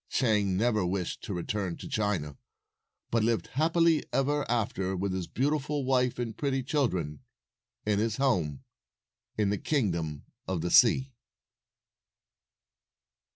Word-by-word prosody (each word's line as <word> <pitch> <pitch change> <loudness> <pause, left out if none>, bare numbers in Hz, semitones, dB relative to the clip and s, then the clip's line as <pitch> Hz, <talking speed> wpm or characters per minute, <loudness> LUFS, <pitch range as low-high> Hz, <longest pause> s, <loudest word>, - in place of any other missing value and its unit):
Chang 105 -6 +2
never 110 -1 +2
wished 90 0 -2
to 100 - -4
return 90 0 -3
to - - -8
China, 95 -9 -1 0.8
but 115 -1 +2
lived 115 0 0
happily 165 +2 +3
ever 145 +2 0
after 100 -5 0
with 95 +1 -1
his 95 -2 -3
beautiful 145 +1 -1
wife 125 -1 +2
and 120 -2 -3
pretty 135 -2 -1
children 95 - -1 0.7
at 105 -1 +2
his 110 0 0
home 90 - 0 0.7
in 105 -2 +2
the 105 - -1
Kingdom 85 - -1 0.2
of 95 -3 -1
the 90 - -2
Sea. 130 +2 +5
110 Hz, 125 wpm, -29 LUFS, 95-135 Hz, 0.8 s, Sea